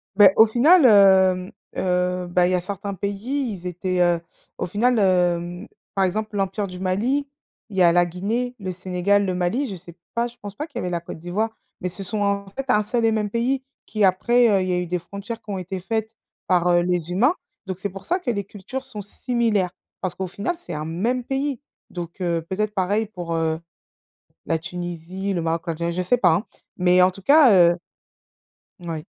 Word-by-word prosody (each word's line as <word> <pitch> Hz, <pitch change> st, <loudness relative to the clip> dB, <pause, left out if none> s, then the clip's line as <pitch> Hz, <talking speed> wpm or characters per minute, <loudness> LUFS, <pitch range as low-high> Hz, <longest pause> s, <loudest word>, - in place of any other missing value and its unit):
Beh, 200 Hz, -2 st, +8 dB
au 220 Hz, -, +9 dB
final, 275 Hz, +8 st, +5 dB
hem, 190 Hz, -3 st, +5 dB, 0.2 s
heu, 180 Hz, 0 st, 0 dB
bah 175 Hz, 0 st, +3 dB
il 185 Hz, -, 0 dB
y -, -, +1 dB
a 180 Hz, -, 0 dB
certains 200 Hz, +1 st, -4 dB
pays, 220 Hz, +7 st, -2 dB
ils 185 Hz, -2 st, -8 dB
étaient, 180 Hz, +1 st, -2 dB
heu, 175 Hz, -1 st, +3 dB, 0.4 s
au -, -, -1 dB
final, 230 Hz, +5 st, +2 dB
hem, 180 Hz, 0 st, +1 dB, 0.3 s
par 195 Hz, -, +2 dB
exemple 215 Hz, +3 st, -2 dB
l'empire 195 Hz, +1 st, -1 dB
du 180 Hz, 0 st, -9 dB
Mali. 235 Hz, +10 st, 0 dB, 0.4 s
Il 195 Hz, -, -8 dB
y -, -, +4 dB
a 170 Hz, -1 st, +7 dB
la 175 Hz, 0 st, +4 dB
Guinée, 220 Hz, +8 st, -2 dB
le 185 Hz, -2 st, -4 dB
Sénégal, 185 Hz, +2 st, +1 dB
le 185 Hz, -, -1 dB
Mali, 180 Hz, +10 st, 0 dB
je 200 Hz, -, -5 dB
sais 170 Hz, -1 st, -13 dB, 0.2 s
pas, 235 Hz, +1 st, 0 dB
je 240 Hz, -, -14 dB
pense 200 Hz, -1 st, -8 dB
pas 300 Hz, +10 st, -5 dB
qu'il 275 Hz, -6 st, -10 dB
y -, -, -1 dB
avait 180 Hz, -, -3 dB
la 170 Hz, -, -1 dB
Côte 170 Hz, -, -8 dB
d'Ivoire, 180 Hz, +7 st, -2 dB, 0.3 s
mais 180 Hz, -, -1 dB
ce 195 Hz, +3 st, -3 dB
sont 210 Hz, +3 st, -2 dB
en 200 Hz, 0 st, 0 dB
fait 270 Hz, 0 st, -4 dB
un 210 Hz, -4 st, +4 dB
seul 230 Hz, +2 st, 0 dB
et 225 Hz, -, +4 dB
même 210 Hz, -2 st, -1 dB
pays. 255 Hz, +3 st, 0 dB, 0.2 s
Qui 215 Hz, -1 st, -1 dB
après, 235 Hz, +6 st, +4 dB
heu, 195 Hz, -2 st, +3 dB
il 185 Hz, -, -2 dB
y 180 Hz, -, +1 dB
a -, -, +1 dB
eu 180 Hz, -, -1 dB
des 180 Hz, +1 st, -2 dB
frontières 200 Hz, +6 st, -7 dB
qui 210 Hz, -, -17 dB
ont 195 Hz, -, -2 dB
été 185 Hz, +1 st, -5 dB
faites 220 Hz, +3 st, -3 dB, 0.3 s
par, 180 Hz, -1 st, +2 dB
heu, 175 Hz, 0 st, +4 dB
les 175 Hz, -1 st, -1 dB
humains. 240 Hz, -, +3 dB, 0.3 s
Donc, 185 Hz, -1 st, -5 dB
c'est 200 Hz, -, -2 dB
pour 195 Hz, +1 st, -10 dB
ça 360 Hz, +3 st, +1 dB
que 275 Hz, -, -4 dB
les 200 Hz, -3 st, -1 dB
cultures 205 Hz, +7 st, -7 dB
sont 215 Hz, -6 st, -7 dB
similaires, 210 Hz, -3 st, 0 dB, 0.3 s
parce 185 Hz, -2 st, -2 dB
qu'au 190 Hz, 0 st, -4 dB
final 205 Hz, -, -3 dB
c'est 260 Hz, -, -7 dB
un 150 Hz, +1 st, -4 dB
même 230 Hz, +10 st, -1 dB
pays. 270 Hz, 0 st, -2 dB, 0.3 s
Donc, 175 Hz, +1 st, -7 dB
heu, 170 Hz, -2 st, 0 dB
peut-être 210 Hz, +3 st, -2 dB
pareil 205 Hz, +3 st, +1 dB
pour, 175 Hz, -5 st, -5 dB
heu, 160 Hz, -1 st, 0 dB, 0.9 s
la 165 Hz, -, +1 dB
Tunisie, 175 Hz, +3 st, -5 dB
le 175 Hz, -, -1 dB
Maroc 165 Hz, 0 st, 0 dB
ou -, -, -2 dB
l'Algérie, 170 Hz, +1 st, -2 dB
je 185 Hz, -, -1 dB
sais 185 Hz, +8 st, +2 dB
pas 180 Hz, -8 st, +4 dB
hein. 175 Hz, -, 0 dB, 0.3 s
Mais 180 Hz, 0 st, +4 dB
en 185 Hz, -, +4 dB
tout 195 Hz, +2 st, -12 dB
cas 280 Hz, +2 st, +6 dB, 0.2 s
heu -, -, -8 dB, 1.0 s
oui. 165 Hz, -3 st, -5 dB
190 Hz, 220 wpm, -23 LUFS, 180-220 Hz, 1.0 s, au